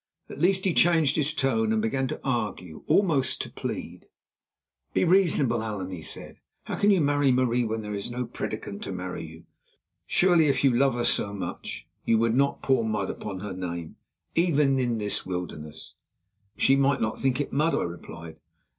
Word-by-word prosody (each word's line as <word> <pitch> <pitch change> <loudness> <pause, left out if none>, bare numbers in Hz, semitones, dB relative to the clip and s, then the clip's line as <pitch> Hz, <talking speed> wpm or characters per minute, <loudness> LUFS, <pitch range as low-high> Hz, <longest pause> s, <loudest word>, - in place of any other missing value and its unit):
At - - -8
least, 185 +3 +2
he 185 - +2
changed 165 -4 +4
his 150 -1 +1
tone 125 -7 +1
and 110 - +2
began 130 +5 0
to - - -5
argue, 105 - -3
almost 160 -10 +2
to - - -6
plead. - - -6 0.9
"Be - - +3
reasonable, 165 -10 +3
Allan," 105 -4 -4
he 90 -3 -6
said. - - -8 0.2
"How - - -4
can 205 - +4
you 195 -3 +5
marry 145 -2 +3
Marie 125 -1 +2
when 110 0 -3
there 105 0 -5
is 100 +2 -2
no 125 +1 -3
prédicant 110 -3 -5
to - - -5
marry 90 -2 -5
you? 80 +1 -11 0.6
Surely, 175 -4 +4
if 135 -2 +1
you 135 -3 +5
love 135 0 +3
her 120 - -1
so 100 0 +1
much, 100 - -6 0.2
you 115 - +3
would 115 0 +2
not 140 +3 +1
pour 130 -3 +2
mud 105 -3 -1
upon 95 -3 -6
her 105 -2 -5
name, 85 -3 -5 0.4
even 150 -5 +3
in 120 -2 0
this 105 -1 0
wilderness?" 80 -4 -6 0.6
"She 135 - +4
might 140 0 +2
not 110 0 -1
think 135 0 +1
it 145 - -3
mud," 155 +4 +2
I - - 0
replied. 85 -1 -8
120 Hz, 185 wpm, -26 LUFS, 100-140 Hz, 0.9 s, you